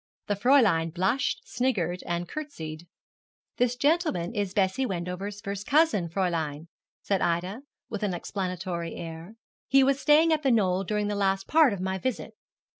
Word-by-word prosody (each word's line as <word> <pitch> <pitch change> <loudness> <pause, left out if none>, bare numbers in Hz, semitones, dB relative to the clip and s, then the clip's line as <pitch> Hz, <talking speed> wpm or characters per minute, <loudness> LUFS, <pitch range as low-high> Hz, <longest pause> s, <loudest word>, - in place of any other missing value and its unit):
The 205 - 0
Fräulein 200 - +4
blushed, 190 +10 0
sniggered, 195 -9 -1
and 175 0 -2
curtseyed. 170 - -7 0.7
'This 245 0 +2
gentleman 285 - +1
is 200 -3 -2
Bessie 195 +6 +1
Wendover's 190 0 -4
first 200 0 -5
cousin, 290 - +3
Fräulein,' 165 -4 -2 0.4
said 195 -2 0
Ida, 180 +7 -1 0.3
with 210 - -5
an 200 -4 -1
explanatory 180 -2 -4
air. 165 +5 -8 0.3
'He 270 0 +5
was 275 +1 +2
staying 310 +3 +5
at 310 - 0
The 275 - +2
Knoll 195 -5 +2
during 210 +1 -1
the 205 - -1
last 195 -1 0
part 315 -4 +5
of 200 -3 -4
my 190 0 -2
visit.' 240 0 -3
195 Hz, 155 wpm, -27 LUFS, 175-250 Hz, 0.7 s, He